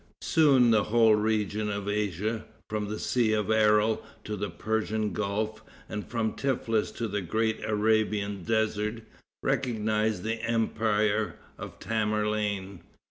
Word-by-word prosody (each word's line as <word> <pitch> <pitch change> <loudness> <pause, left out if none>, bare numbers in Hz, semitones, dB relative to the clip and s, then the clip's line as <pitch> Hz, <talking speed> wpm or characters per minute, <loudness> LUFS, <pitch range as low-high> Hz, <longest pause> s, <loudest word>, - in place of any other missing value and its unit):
Soon 135 -7 +5
the 110 -2 +3
whole 115 0 +5
region 105 0 0
of 100 -1 -3
Asia, 105 +2 -1 0.2
from 105 -1 -2
the 105 +1 -4
Sea 115 -2 +1
of 105 0 0
Aral 110 0 +3 0.2
to 105 - -4
the 100 -1 -3
Persian 110 +3 -1
Gulf, 105 +1 -2 0.3
and 105 0 -6
from 110 -3 -1
Teflis 115 -5 0
to 115 - -2
the 105 -1 -2
great 110 +5 -1
Arabian 105 -2 +1
desert, 110 +2 -1 0.4
recognized 110 -4 0
the 110 +1 -2
empire 110 -2 +1 0.2
of - - -8
Tamerlane. 105 -3 -1
110 Hz, 130 wpm, -28 LUFS, 105-110 Hz, 0.4 s, Soon